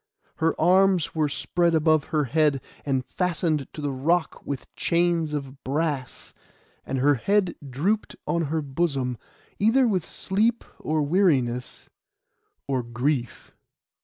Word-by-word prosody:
Her 165 0 0
arms 185 0 +4
were 155 -2 +1
spread 170 +3 +1
above 155 -1 +3
her 155 -2 0
head, 145 +1 +2 0.3
and 135 -2 0
fastened 165 -5 -1
to 150 - -7
the 145 -1 -1
rock 160 +5 0
with 140 -3 -5
chains 170 -2 +1
of 140 -2 -5
brass; 145 -2 -3 0.5
and 135 - -3
her 140 +3 +4
head 185 - +1 0.2
drooped 185 - -1
on 170 -1 0
her 155 +1 -1
bosom, 135 -4 -1 0.4
either 240 +5 +4
with 190 -6 +1
sleep, 220 +8 0 0.2
or 155 -1 0
weariness, 140 -8 +1 0.8
or 135 -2 0
grief. 120 +1 -3
155 Hz, 130 wpm, -25 LUFS, 135-175 Hz, 0.8 s, arms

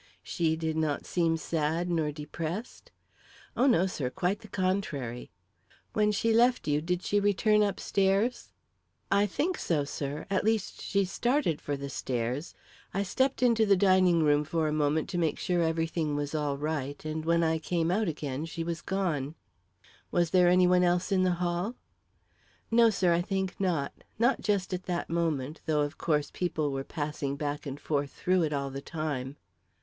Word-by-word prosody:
"She 160 -3 0
did 160 -1 -2
not 155 -2 -1
seem 165 -2 +1
sad 160 +1 -1
nor 160 -3 +1
depressed?" 165 - -6 0.7
"Oh, 260 - +3
no, 190 -9 +4
sir; 150 -9 -2
quite 185 +8 -1
the 215 - -13
contrary." 185 - -2 0.6
"When 210 -1 +3
she 225 +2 +1
left 240 -1 +3
you, 145 0 +2
did 180 +2 -2
she 205 - +2
return 210 +1 +3
upstairs?" 200 +3 +1 0.6
"I 200 +1 +4
think 330 - -1
so, 155 -4 0
sir. 140 +1 -4
At 195 - +1
least, 220 -2 0
she 200 -1 +1
started 240 - 0
for 145 -1 -3
the 140 0 -5
stairs. 125 +3 -3 0.4
I 200 - +1
stepped 260 +7 0
into 230 -2 +4
the 200 -2 +5
dining 185 -3 +4
room 145 0 +3
for 160 +1 -1
a 150 - -1
moment 150 +1 +1
to 180 -3 -2
make 160 -3 +1
sure 175 -2 0
everything 165 -2 0
was 145 0 -3
all 145 -2 -1
right, 145 -1 -3
and 155 0 -3
when 170 +1 +2
I 160 0 +1
came 165 +1 0
out 210 +3 +1
again 145 -2 -3
she 165 0 -5
was 165 -1 -3
gone." 165 -7 -2 0.7
"Was 170 - +1
there 180 -2 +5
any 180 0 +5
one 180 0 +4
else 175 +3 +1
in 190 -1 +3
the 185 -1 +3
hall?" 175 +6 -1 1.0
"No, 230 0 +6
sir; 185 -5 +2
I 170 - +2
think 190 0 -2
not; 175 -8 0 0.2
not 240 +4 +2
just 200 -3 0
at 185 0 -4
that 175 -2 -2
moment, 160 -3 -1
though 150 -2 +2
of 145 +3 -3
course 150 -3 0
people 155 -5 -1
were 135 0 -3
passing 145 -1 -3
back 145 +1 -4
and 140 +1 -5
forth 145 -2 -1
through 185 +5 +1
it 155 -2 0
all 140 -1 -2
the 135 +1 -5
time." 145 -4 -4
170 Hz, 180 wpm, -29 LUFS, 150-190 Hz, 1.0 s, No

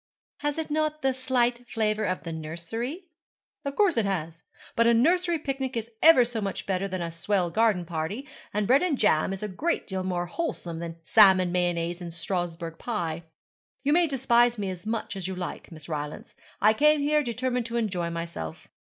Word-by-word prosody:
'Has 295 0 -2
it 320 -2 -3
not 305 -1 -1
a 265 - +3
slight 245 -2 0
flavour 215 -2 0
of 185 -1 -2
the 165 - -5
nursery?' 225 - -5 0.5
'Of 280 -1 -4
course 395 - +3
it 225 - +3
has. 165 -4 -3 0.3
But 230 0 +4
a 235 - +5
nursery 345 +7 +3
picnic 270 -4 -3
is 230 +1 -4
ever 315 -7 +8
so 230 -2 -4
much 195 -1 -3
better 195 0 -1
than 185 -2 -3
a 165 - -4
swell 175 +1 0
garden 215 -4 +2
party, 170 - -4 0.2
and 210 0 0
bread 260 - +5
and 350 -6 +1
jam 190 -6 +3
is 195 +1 -5
a - - -1
great 290 - -1
deal 190 -1 -3
more 180 -1 -1
wholesome 175 - -4
than 165 -1 -5
salmon 190 -2 +6
mayonaise 175 -1 0
and 170 -1 -6
Strasbourg 170 -1 -4
pie. 170 -8 -3 0.6
You 290 +1 +3
may 345 +1 +4
despise 240 -3 +3
me 200 -2 -2
as 185 +3 -8
much 225 -1 -2
as 190 -2 -4
you 190 - -4
like, 180 -1 -6
Miss 155 -2 -10
Rylance. 150 -2 -5 0.2
I 215 +1 +5
came 300 +5 +4
here 300 +1 +3
determined 250 -1 -1
to 235 +1 -3
enjoy 185 -7 -1
myself.' 165 - -6
210 Hz, 195 wpm, -27 LUFS, 175-260 Hz, 0.6 s, ever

